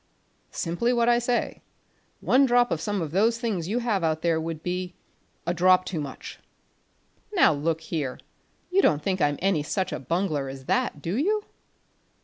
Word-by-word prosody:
"Simply 175 +8 -1
what 235 -1 +2
I 240 0 +4
say. 240 0 -1 0.6
One 270 +1 +4
drop 245 0 +3
of 160 - -1
some 205 -4 -1
of 150 - -5
those 220 +6 +2
things 215 -9 -2
you 215 +5 -1
have 225 -7 0
out 160 -1 0
there 165 -2 +2
would 160 -1 -5
be 180 0 -3 0.5
a 175 - 0
drop 185 +1 +4
too 165 -4 -3
much." 140 -2 -8 0.9
"Now, 355 - +5
look 160 +2 -1
here, 150 -5 -4 0.5
you 390 +2 +4
don't 150 - +2
think 185 -2 -1
I'm 145 -1 +2
any 190 -6 +2
such 185 +5 -2
a - - -3
bungler 155 -1 -1
as 135 0 -9
that, 145 +2 -1
do 170 +4 -2
you?" 415 - +1
180 Hz, 175 wpm, -26 LUFS, 160-230 Hz, 0.9 s, Now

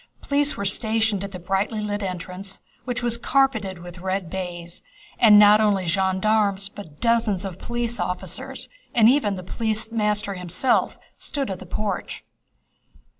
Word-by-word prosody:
Police 285 +1 +1
were 200 - -3
stationed 220 0 +2
at 200 - -6
the 185 - -6
brightly 195 +5 -1
lit 210 0 -3
entrance 185 +1 -5 0.3
which 245 -1 -3
was 235 -1 +2
carpeted 230 -9 +1
with 175 0 -10
red 185 -1 -3
baize, 175 -2 -6 0.4
and 215 -3 +8
not 210 +1 +7
only 200 -3 +2
gendarmes 195 +3 +1
but 165 -8 -12
dozens 225 -5 +1
of 185 -2 -6
police 240 0 -3
officers 180 0 -4 0.3
and 225 -2 +6
even 240 -6 +3
the 185 - -7
police 220 +3 -1
master 210 -2 0
himself 180 +7 +1 0.2
stood 275 -7 -2
at 185 - -5
the 185 - -11
porch. 200 +1 -4
205 Hz, 150 wpm, -23 LUFS, 185-225 Hz, 0.4 s, and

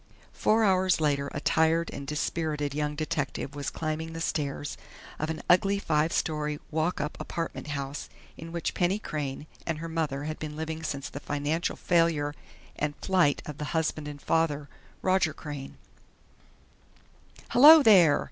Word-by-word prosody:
Four 220 +1 +2
hours 185 -3 +3
later 140 -2 +1
a - - -4
tired 160 +3 +2
and 140 0 -7
dispirited 150 -1 -2
young 150 0 -1
detective 150 -3 -3
was 145 -1 -3
climbing 160 0 -4
the 165 - -5
stairs 145 -3 -2 0.4
of 155 - -2
an 160 - -4
ugly, 195 +3 +4
five 160 -4 +1
story 150 -2 -1
"walk 160 +3 0
up" 150 +1 -3
apartment 165 -2 -4
house 140 -1 -4 0.3
in 165 +1 -9
which 170 0 -2
Penny 180 +3 +1
Crain 150 -8 -4 0.2
and 165 -2 -1
her 165 +2 -5
mother 155 -4 -2
had 155 +1 -4
been 150 -1 -5
living 160 +1 -4
since 145 -3 -4
the 145 - -7
financial 145 +4 -1
failure 165 -4 +2 0.4
and 145 0 -2
flight 180 -6 +2
of 150 -1 -8
the 150 - -3
husband 155 -1 -1
and 145 -1 -7
father, 150 -2 0 0.4
Roger 185 -4 +2
Crain. 145 -3 -7 1.7
"Hello, 300 +5 +9
there!" 180 - +7
155 Hz, 155 wpm, -28 LUFS, 145-165 Hz, 1.7 s, Hello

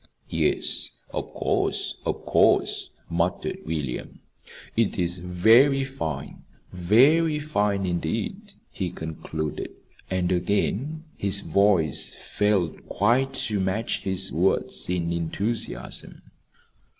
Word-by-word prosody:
"Yes, - - +1 0.2
of - - -4
course, - - -1
of - - -2
course," - - +3 0.2
muttered - - -1
William. 75 -6 -3 0.6
"It 115 -2 +1
is 90 -1 -1
very 115 +11 +5
fine, 80 - -5 0.3
very 135 - +4
fine 105 -10 0
indeed," 110 - -3 0.2
he 95 -3 -3
concluded. 80 -2 -5 0.4
And 95 -1 0
again 105 - 0
his 100 0 +2
voice 100 -8 +2
failed 100 -6 0
quite 125 +6 +2
to 105 -2 -1
match 95 +5 -1
his 95 0 -2
words 90 +2 0
in 85 -2 0
enthusiasm. 85 - -3
100 Hz, 100 wpm, -25 LUFS, 85-115 Hz, 0.6 s, very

